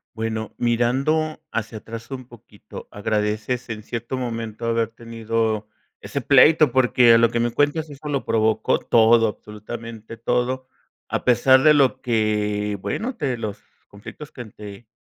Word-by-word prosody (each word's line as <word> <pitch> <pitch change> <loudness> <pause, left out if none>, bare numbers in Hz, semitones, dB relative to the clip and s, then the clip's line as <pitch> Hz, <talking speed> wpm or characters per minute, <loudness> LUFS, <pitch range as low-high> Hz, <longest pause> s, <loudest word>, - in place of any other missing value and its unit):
Bueno, 110 -1 -4
mirando 135 +7 0
hacia 110 -1 -3
atrás 115 +3 -9
un 130 -2 -7
poquito, 115 -4 -13
¿agradeces 105 +4 -2
en 110 -2 -5
cierto 120 +3 -5
momento 115 -2 -5
haber 115 -1 0
tenido 115 -2 -3 0.3
ese - - -4
pleito? 155 -4 +5
Porque, 125 -2 +5
a - - +7
lo 115 0 +4
que 120 - -1
me 120 0 0
cuentas, 145 +5 0
eso 145 +1 -8
lo 140 -2 -2
provocó 110 -1 +1
todo, 115 0 +4
absolutamente 110 +2 -9
todo, 125 +3 -1 0.4
a - - -3
pesar 130 +2 +5
de 155 - +7
lo 140 -3 +2
que, 105 -3 0
bueno, 245 - -3
de 140 - -2
los 110 -3 -5 0.3
conflictos 115 +8 -11
que 125 - -8
te 105 +1 -11
115 Hz, 150 wpm, -22 LUFS, 110-130 Hz, 0.4 s, a